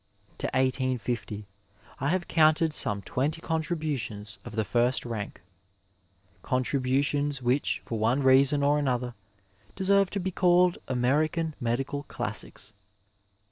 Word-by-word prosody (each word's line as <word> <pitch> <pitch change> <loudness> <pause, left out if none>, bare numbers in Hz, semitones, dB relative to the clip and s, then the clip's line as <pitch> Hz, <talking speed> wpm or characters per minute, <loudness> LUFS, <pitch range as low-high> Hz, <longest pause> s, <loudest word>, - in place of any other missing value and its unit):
To - - -1
1850, 125 -5 -1 0.5
I 135 - -1
have 180 +1 0
counted 155 0 +3
some 100 -8 +1
twenty 145 - -1
contributions 150 -11 -3
of 105 - -9
the 110 - +1
first 120 +4 +1
rank, 110 -4 -5 1.0
con 130 0 0
tributions 140 +1 0
which 125 +4 0
for 115 - -3
one 120 +6 +2
reason 135 +2 +5
or 145 +1 +3
another 125 -3 -1 0.6
deserve 195 0 +3
to 200 - -3
be 190 0 -2
called 180 0 +3
American 150 +6 +1
medical 135 +4 -1
classics. - - -4
135 Hz, 120 wpm, -28 LUFS, 120-155 Hz, 1.0 s, reason